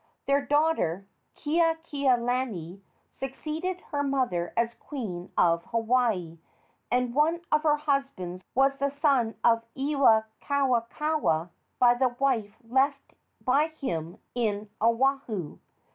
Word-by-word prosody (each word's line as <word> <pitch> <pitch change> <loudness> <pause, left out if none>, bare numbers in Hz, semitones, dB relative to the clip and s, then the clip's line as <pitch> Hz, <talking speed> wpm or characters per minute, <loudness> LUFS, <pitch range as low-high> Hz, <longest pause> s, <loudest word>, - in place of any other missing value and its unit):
Their 280 0 +2
daughter, 290 - +1 0.3
Keakealani, 260 - 0 0.3
succeeded 315 +7 -4
her 285 -1 0
mother 255 -12 0
as 235 0 +1
queen 205 -13 -6
of 170 -1 +3
Hawaii, 225 -8 0 0.5
and 250 -1 +1
one 315 +5 +2
of 305 - +4
her 305 -1 +3
husbands 275 - -2
was 275 +1 +3
the 280 +1 +1
son 275 -6 +1
of 230 -1 +4
Iwikauikaua 265 - +1 0.3
by 240 -1 +6
the 255 +1 +2
wife 230 -6 0
left 270 +3 +1 0.3
by 285 +4 +3
him 175 - -5 0.2
in 215 -3 -2
Oahu. 230 - 0
255 Hz, 105 wpm, -27 LUFS, 220-285 Hz, 0.5 s, by